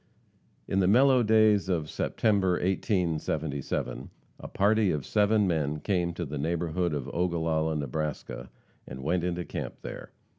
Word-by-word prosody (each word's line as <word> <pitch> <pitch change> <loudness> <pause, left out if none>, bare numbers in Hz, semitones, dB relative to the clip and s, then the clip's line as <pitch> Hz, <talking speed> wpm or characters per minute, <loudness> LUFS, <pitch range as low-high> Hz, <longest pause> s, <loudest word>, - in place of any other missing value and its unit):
In 95 - 0
the 95 - +3
mellow 130 +5 +5
days 110 -3 +4
of 80 -5 0
September, 100 +1 +1
1877, 80 - -1 0.3
a - - -8
party 105 +1 +2
of 75 -6 -2
seven 105 0 +3
men 75 -4 0
came 90 -1 0
to 85 - -3
the 75 0 -5
neighborhood 85 +1 -1
of 70 -4 -4
Ogallala, 80 -2 0
Nebraska, 70 -3 -4 0.4
and 65 +1 -8
went 85 +4 0
into 90 -1 -2
camp - - -5
there. - - -8
85 Hz, 140 wpm, -28 LUFS, 75-100 Hz, 0.4 s, mellow